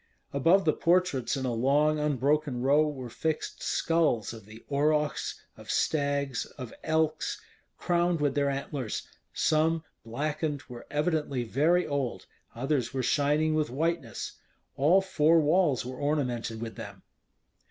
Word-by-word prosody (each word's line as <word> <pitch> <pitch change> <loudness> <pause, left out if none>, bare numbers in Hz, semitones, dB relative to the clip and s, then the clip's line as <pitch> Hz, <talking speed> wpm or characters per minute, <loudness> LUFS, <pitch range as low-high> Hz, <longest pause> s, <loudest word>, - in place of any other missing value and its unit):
Above 165 +8 +4
the 155 - +4
portraits 170 -8 +1
in 130 - -3
a 125 - -1
long 145 +6 +2
unbroken 145 -1 +1
row 145 +4 +4
were 135 -4 -5
fixed 155 +6 -3
skulls 160 -10 +1
of 110 -3 -12
the 110 +2 -13
aurochs, 150 +1 0 0.2
of - - -14
stags, 140 -4 0
of 125 -4 -7
elks, 160 -1 0 0.4
crowned 175 -1 +1
with 145 -1 +1
their 140 -1 +1
antlers: 135 -3 -4 0.2
some, 160 +1 +1 0.2
blackened, 145 +4 -2
were 120 -2 -11
evidently 150 -4 0
very 155 +10 +2
old; 140 -4 -2 0.3
others 135 +1 -1
were 130 - 0
shining 150 +3 +2
with 155 -3 +1
whiteness. 140 -3 -3 0.4
All 165 +8 +4
four 165 -3 +3
walls 150 -4 +2
were 130 0 -6
ornamented 125 -6 -1
with 115 - -7
them. - - -9
145 Hz, 135 wpm, -28 LUFS, 130-155 Hz, 0.4 s, Above